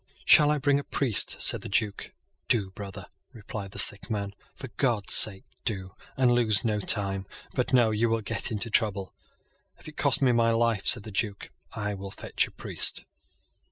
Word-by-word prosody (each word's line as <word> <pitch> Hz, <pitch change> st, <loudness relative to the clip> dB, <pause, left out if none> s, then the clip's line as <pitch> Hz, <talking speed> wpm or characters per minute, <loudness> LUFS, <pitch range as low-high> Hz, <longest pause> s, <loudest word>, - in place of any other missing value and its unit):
"Shall 150 Hz, -1 st, +6 dB
I 150 Hz, -, +1 dB
bring 140 Hz, 0 st, +1 dB
a -, -, -6 dB
priest?" 125 Hz, -8 st, 0 dB
said -, -, +4 dB
the -, -, -8 dB
Duke. 100 Hz, 0 st, -2 dB, 0.4 s
"Do, 100 Hz, -5 st, +1 dB
brother," 100 Hz, -1 st, -9 dB, 0.3 s
replied 105 Hz, -2 st, -8 dB
the -, -, -12 dB
Sick 100 Hz, -, +3 dB
man. 100 Hz, -2 st, -4 dB, 0.2 s
"For 130 Hz, -, -9 dB
God's 115 Hz, -2 st, -1 dB
sake 95 Hz, -3 st, +4 dB, 0.2 s
do, 95 Hz, -4 st, -4 dB, 0.2 s
and 130 Hz, -2 st, +3 dB
lose 115 Hz, -5 st, +2 dB
no 105 Hz, -2 st, 0 dB
time. 95 Hz, -1 st, +1 dB, 0.3 s
But 125 Hz, -, -2 dB
no; 120 Hz, -4 st, +3 dB
you 110 Hz, +2 st, 0 dB
will 115 Hz, 0 st, -1 dB
get 100 Hz, -, -2 dB
into 110 Hz, +1 st, -1 dB
trouble." 100 Hz, -4 st, 0 dB, 0.6 s
"If -, -, -16 dB
it 155 Hz, -, -12 dB
costs 140 Hz, -, +4 dB
me 130 Hz, -, +4 dB
my 115 Hz, -1 st, +2 dB
life," 115 Hz, -3 st, 0 dB
said 105 Hz, -, +3 dB
the 110 Hz, -, -10 dB
Duke, 100 Hz, 0 st, -4 dB, 0.2 s
"I 105 Hz, -2 st, -4 dB
will 100 Hz, 0 st, -8 dB
fetch -, -, -2 dB
a -, -, -16 dB
priest." -, -, -1 dB
110 Hz, 190 wpm, -26 LUFS, 100-120 Hz, 0.6 s, Shall